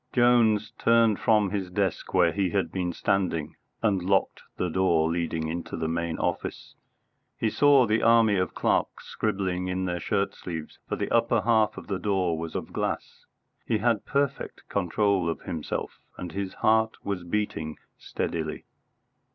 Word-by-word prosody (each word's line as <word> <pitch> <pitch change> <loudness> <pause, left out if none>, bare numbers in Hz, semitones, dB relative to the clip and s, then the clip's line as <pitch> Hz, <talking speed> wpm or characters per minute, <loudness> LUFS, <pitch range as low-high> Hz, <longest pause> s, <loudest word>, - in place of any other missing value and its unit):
Jones 120 -4 +4
turned 115 -3 +4
from 105 -3 +3
his 95 -3 -2
desk 95 -1 -2
where - - +4
he 100 -2 0
had 90 -3 -1
been 90 -2 -2
standing, 85 -3 -1 0.3
and 100 -4 +2
locked 95 +2 +1 0.2
the 90 - 0
door 85 -3 +2
leading 85 -1 -2
into 85 +2 -4
the 80 - -2
main 85 0 -2
office. - - -3 0.6
He 110 - 0
saw 140 -3 +5
the 110 +1 +1
army 115 -2 +5
of 90 - -1
clerks - - 0
scribbling 90 -2 -2
in 95 0 -1
their 90 -1 -2
shirt 100 +3 -1
sleeves, 80 -3 -7
for - - 0
the - - -3
upper - - +3
half 110 -2 +2
of - - -8
the 95 -2 -3
door 95 -5 0
was 80 0 -6
of - - -5
glass. - - -4 0.4
He 115 - +2
had 115 -1 +1
perfect 140 -1 -2
control 100 -1 +1
of 80 - -4
himself, 80 -3 -4 0.2
and 90 - -6
his 95 +1 -4
heart 110 0 +2
was 100 -3 -3
beating 85 -4 -3 0.2
steadily. 80 -2 -4
95 Hz, 160 wpm, -27 LUFS, 85-110 Hz, 0.6 s, saw